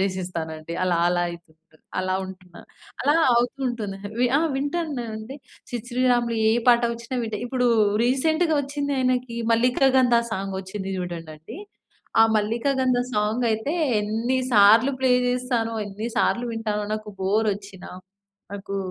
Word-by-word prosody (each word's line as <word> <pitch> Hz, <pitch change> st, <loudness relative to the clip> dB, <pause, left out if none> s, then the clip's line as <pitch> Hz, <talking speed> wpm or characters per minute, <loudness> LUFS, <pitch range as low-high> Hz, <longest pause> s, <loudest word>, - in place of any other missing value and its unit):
జేసేస్తానండి 170 Hz, -4 st, -3 dB
అలా 180 Hz, -2 st, +2 dB
అలాయితూంటుంది. 170 Hz, -2 st, -4 dB, 0.2 s
అలా 185 Hz, 0 st, 0 dB
ఉంటున్నా. 185 Hz, -2 st, -12 dB, 0.4 s
అలా 290 Hz, +3 st, +3 dB, 0.2 s
అవుతూ 245 Hz, +3 st, 0 dB
ఉంటుంది. 215 Hz, -5 st, -4 dB, 0.2 s
వి 250 Hz, -, +3 dB
ఆ! -, -, +1 dB, 0.2 s
వింటానండి 270 Hz, -6 st, -4 dB, 0.3 s
'సిద్ 240 Hz, -1 st, -5 dB
శ్రీరామ్‌లు' 240 Hz, -2 st, +1 dB
ఏ -, -, +3 dB, 0.2 s
పాట 240 Hz, 0 st, +6 dB
వచ్చినా 235 Hz, +2 st, -6 dB
వింటా. 220 Hz, -2 st, -3 dB
ఇప్పుడు 250 Hz, 0 st, 0 dB, 0.4 s
రీసెంట్‌గా 315 Hz, +6 st, +2 dB
వచ్చింది 285 Hz, 0 st, -3 dB
ఆయనకి 255 Hz, -2 st, 0 dB, 0.2 s
'మల్లికా 250 Hz, +3 st, +3 dB
గంధ' 245 Hz, -2 st, +4 dB
సాంగ్ 195 Hz, -1 st, -3 dB
వచ్చింది 190 Hz, 0 st, -6 dB
చూడండండి. 165 Hz, -, -7 dB, 0.6 s
ఆ -, -, +9 dB
'మల్లికా 225 Hz, +6 st, 0 dB
గంధ' 255 Hz, -1 st, +2 dB
సాంగ్ 215 Hz, +4 st, 0 dB
అయితే 220 Hz, +6 st, -1 dB, 0.3 s
ఎన్ని 225 Hz, +5 st, -1 dB
సార్లు 225 Hz, +5 st, +6 dB
ప్లే 260 Hz, -1 st, +2 dB, 0.2 s
చేస్తానో, 245 Hz, -2 st, -1 dB
ఎన్ని 205 Hz, +3 st, -6 dB
సార్లు 240 Hz, +3 st, +1 dB
వింటానో, 215 Hz, -2 st, -2 dB
నాకు 215 Hz, 0 st, -7 dB
బోర్ 210 Hz, +3 st, +1 dB
వచ్చిన, 200 Hz, -2 st, -12 dB, 0.7 s
నాకు 200 Hz, 0 st, -5 dB
225 Hz, 135 wpm, -24 LUFS, 195-250 Hz, 0.7 s, ఆ